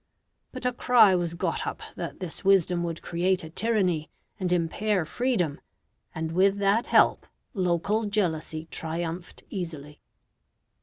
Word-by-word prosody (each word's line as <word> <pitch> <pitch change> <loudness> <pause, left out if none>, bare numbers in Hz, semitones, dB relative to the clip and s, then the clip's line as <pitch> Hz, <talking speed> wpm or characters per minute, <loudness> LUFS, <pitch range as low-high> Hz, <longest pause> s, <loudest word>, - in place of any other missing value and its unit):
But 255 -1 -8
a 250 - +1
cry 235 -5 +5
was 175 -2 0
got - - -2
up - - -5
that - - -6
this 180 -1 -6
wisdom 185 -3 +3
would 170 -1 -4
create 180 +2 0
a 160 - -9
tyranny 185 -7 0 0.3
and 185 -2 -1
impair 180 +2 +1
freedom, 185 - -1 0.5
and 160 0 -3
with 195 +3 +3
that 200 +4 +2
help, - - +4 0.3
local 190 +3 0
jealousy 160 -6 -1
triumphed 165 +2 -4
easily. 155 -6 -6
180 Hz, 135 wpm, -27 LUFS, 165-205 Hz, 0.5 s, cry